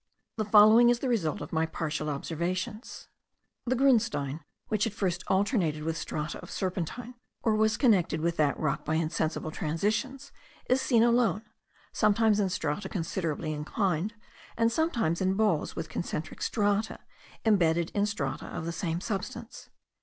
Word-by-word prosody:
The 215 - -1
following 215 +3 +7
is 240 - +3
the 265 - -3
result 195 - 0
of - - -7
my 160 0 +1
partial 155 -2 -3
observations. 175 - -4 0.6
The 255 - +2
grunstein, 230 - +2 0.3
which 215 +1 +1
at 215 - -5
first 185 -4 -1
alternated 190 - +1
with 160 0 -2
strata 155 -1 -4
of - - -11
serpentine, 190 +6 -4 0.3
or 225 - +3
was 220 0 +2
connected 205 - +3
with 170 +1 0
that 150 -2 +1
rock 150 -3 -1
by 155 - -1
insensible 160 0 -1
transitions, 215 - -2 0.4
is 255 +1 +3
seen 240 -4 +3
alone, 235 -3 +2 0.5
sometimes 215 0 +3
in 195 -2 +1
strata 185 +2 -2
considerably 165 -3 -2
inclined, 180 +6 -1 0.4
and 230 0 +3
sometimes 230 - 0
in 190 0 +1
balls 215 +1 +1
with - - -4
concentric - - -5
strata, 205 0 0 0.5
imbedded 170 -6 +3
in 205 0 +1
strata 140 -10 -3
of 160 - -5
the 170 - -2
same 170 0 -3
substance. 220 +4 -5
195 Hz, 150 wpm, -29 LUFS, 160-225 Hz, 0.6 s, following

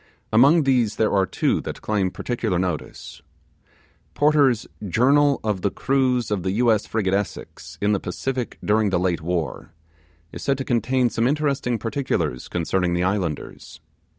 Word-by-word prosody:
Among 140 +8 +6
these, 125 -6 +2
there 110 - +1
are 95 -2 +2
two - - 0
that - - -7
claim 100 -3 0
particular 110 -2 -2
notice. 90 -4 -4 0.9
Porter's 145 -6 +3 0.2
'Journal 140 +7 +3
of 105 -4 -1
the 100 - +1
Cruise 130 -1 0
of 100 -3 0
the 95 +1 -2
U.S. 110 -1 +2
frigate 100 -4 -1
Essex, 100 0 -4
in 105 +1 +1
the 100 - +1
Pacific, 125 +8 -4
during 105 0 +2
the 90 -2 +1
late 90 -2 0
War', 85 -1 -3 0.6
is - - -8
said 135 -1 0
to 135 - -4
contain 125 0 +1
some 115 +1 +1
interesting 140 -4 0
particulars 115 - -2
concerning 90 +1 -1
the 90 - 0
islanders. 90 -5 -3
110 Hz, 150 wpm, -23 LUFS, 95-130 Hz, 0.9 s, Among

